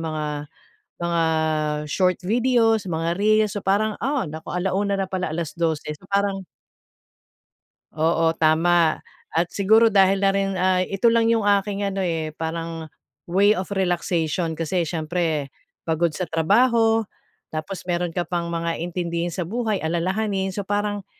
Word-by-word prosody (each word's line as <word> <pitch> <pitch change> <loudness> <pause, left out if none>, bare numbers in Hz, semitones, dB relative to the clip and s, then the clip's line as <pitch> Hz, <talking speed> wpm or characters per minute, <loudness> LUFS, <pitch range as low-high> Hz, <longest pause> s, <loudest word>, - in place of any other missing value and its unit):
mga, 150 -2 -4 0.5
mga 170 -1 +1 0.7
short 185 -2 +2
videos, 225 -1 +2
mga 165 0 -1
reels, 215 0 +3
so 205 - -3
parang, 210 +2 +1
ah, 275 -3 0
naku 160 +1 -8
1:00 195 +2 0
na 195 - -1
pala, 185 -3 -2
12:00 160 -1 -2
so 185 +5 -18
parang 195 -1 0 1.5
Oo, 165 +1 +2
tama 165 +1 +3 0.4
at 170 +1 +3
siguro 220 +3 +4
dahil 195 -1 +4
na 195 - +5
rin 195 -1 -1
ay 185 0 +1
ito 195 +4 +1
lang 230 -1 +3
yung 225 -2 +2
aking 200 0 +1
ano, 195 0 -2
eh, 160 -3 -2
parang 165 0 -5 0.4
way 200 +4 +4
of 185 -2 -3
relaxation 170 -2 0
kasi 170 +2 0
siyempre, 160 -3 -2 0.3
pagod 165 +1 +1
sa 180 - -1
trabaho 225 +7 +3 0.5
tapos 175 +4 -5
mayro'n 175 0 -1
ka 175 +1 -3
pang 170 -1 -2
mga 170 0 -2
intindihin 170 0 -2
sa 170 0 -4
buhay, 220 0 -1
alalahanin. 190 +4 -1
So 200 0 -5
parang, 205 -1 -2
180 Hz, 140 wpm, -23 LUFS, 165-200 Hz, 1.5 s, na